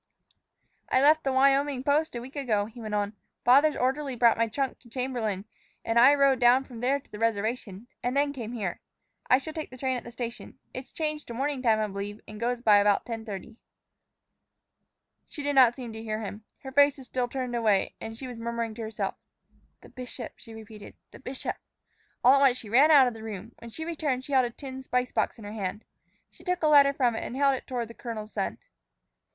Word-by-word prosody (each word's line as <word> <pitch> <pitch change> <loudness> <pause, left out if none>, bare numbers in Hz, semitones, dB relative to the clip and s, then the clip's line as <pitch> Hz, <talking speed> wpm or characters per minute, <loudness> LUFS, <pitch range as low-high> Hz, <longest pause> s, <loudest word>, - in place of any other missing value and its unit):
"I - - +3
left 305 +3 +5
the 270 - 0
Wyoming 275 0 +3
post 295 +1 +1
a 240 - -3
week 265 +4 -11
ago," 225 -8 0
he 230 +3 -11
went 215 -1 -3
on. 205 0 -1 0.3
"Father's 280 +5 +6
orderly 265 +1 -1
brought 235 -1 +5
my 230 0 +1
trunk 265 +4 -2
to 240 - -19
Chamberlain, 230 -6 -2 0.4
and 230 +1 +3
I 270 +4 +8
rode 275 -2 +4
down 250 +2 +5
from 245 -4 -11
there 265 +4 +1
to - - -25
the 210 - -8
reservation 220 -1 -2 0.2
and 250 +2 -1
then 285 0 +2
came 240 -4 -6
here. 200 -7 -3 0.5
I 255 - +7
shall 290 +4 -6
take 315 -1 -5
the 255 - -11
train 260 0 -1
at - - -7
the - - -9
station. 235 0 -7 0.2
It's 255 +1 -8
changed 305 -1 -3
to 235 - -7
morning 275 +1 -1
time, 225 -3 +3
I 215 - +1
believe, 205 +1 -5
and 215 0 -9
goes 240 +1 -1
by 215 -4 +6
about 205 0 +3
10:30." 225 -1 -7 1.7
She 295 - -6
seemed 290 0 0
not 255 -3 +6
to 255 -3 -7
hear 220 0 -4
him. 210 0 -7 0.2
Her 265 - -7
face 285 +1 +5
was 265 - -11
still 250 0 -1
turned 250 -1 -4
away, 215 -4 +2
and 225 0 -7
she 265 - -7
was 245 -2 -8
murmuring 230 -1 -3
to 230 - -8
herself. 220 -1 -3 0.7
"The - - -15
bishop!" 250 -1 -7
she 225 - -12
repeated; 220 -1 -11 0.2
"the - - -13
bishop!" 265 0 -5 0.7
All 255 - +8
at 275 - +5
once 265 -3 +4
she 220 - -10
ran 270 +8 +6
out 285 -4 +8
of 245 - -2
the 225 - -10
room. 220 0 -7
When 235 - -10
she 320 +8 -6
returned, 295 -6 -2
she 285 - -6
held 260 -2 +5
a - - -2
tin 265 +2 -8
spice 250 -1 -1
box - - 0
in 220 - -11
her 205 - -6
hand. 205 0 -4 0.5
She - - -19
took 360 -2 -1
a - - +5
letter 285 -2 +7
from 250 -4 +1
it - - -3
and 250 - -5
held 275 0 +4
it 260 - -5
toward 245 -3 -3
the 230 - -11
colonel's 220 -3 -7
son. - - -2
245 Hz, 225 wpm, -28 LUFS, 225-270 Hz, 1.7 s, I